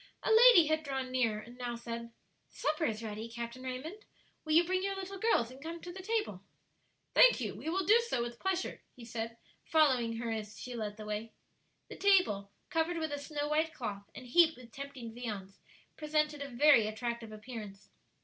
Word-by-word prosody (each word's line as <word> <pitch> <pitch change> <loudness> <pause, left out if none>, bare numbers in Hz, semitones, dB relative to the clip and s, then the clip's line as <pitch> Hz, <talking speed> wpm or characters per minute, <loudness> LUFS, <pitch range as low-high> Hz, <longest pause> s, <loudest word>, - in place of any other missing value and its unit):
A - - +1
lady 450 -6 +9
had 315 +1 +1
drawn 265 -3 -4
near, 235 -4 +1
and 240 +3 -12
now 240 -1 -3
said, 235 0 -6 0.4
"Supper 310 +1 -1
is 220 -4 -2
ready, 220 +1 -5
Captain 235 +2 -6
Raymond; 265 +11 -6 0.4
will 310 - -1
you 335 +2 +7
bring 370 +2 0
your 390 0 -1
little 385 0 -6
girls 305 - +2
and 260 +1 -13
come 330 +2 -6
to 350 - -8
the 380 - -7
table?" 420 - -2 0.7
"Thank - - +7
you; 215 -5 -3
we 250 +10 -5
will 375 +2 0
do 435 +5 +6
so 265 - 0
with 240 0 -6
pleasure," 380 -1 -2
he 240 - -11
said, 230 0 -5 0.3
following 260 -8 +3
her 230 0 -3
as 215 -1 -5
she 250 - -6
led 215 -3 -4
the 215 - -8
way. 210 +2 -4 0.5
The - - -9
table, 360 - +3 0.2
covered 325 +1 +1
with 315 -2 -2
a 290 - -3
snow 290 0 -3
white 315 +2 +1
cloth 200 -4 -5
and 255 - -9
heaped 320 +5 +4
with 245 -2 -14
tempting 265 -3 -8
viands, 205 -5 -6 0.4
presented 300 -1 0
a 280 - -4
very 245 -3 +5
attractive 230 +1 -4
appearance. 215 -3 -9
255 Hz, 195 wpm, -32 LUFS, 230-320 Hz, 0.7 s, lady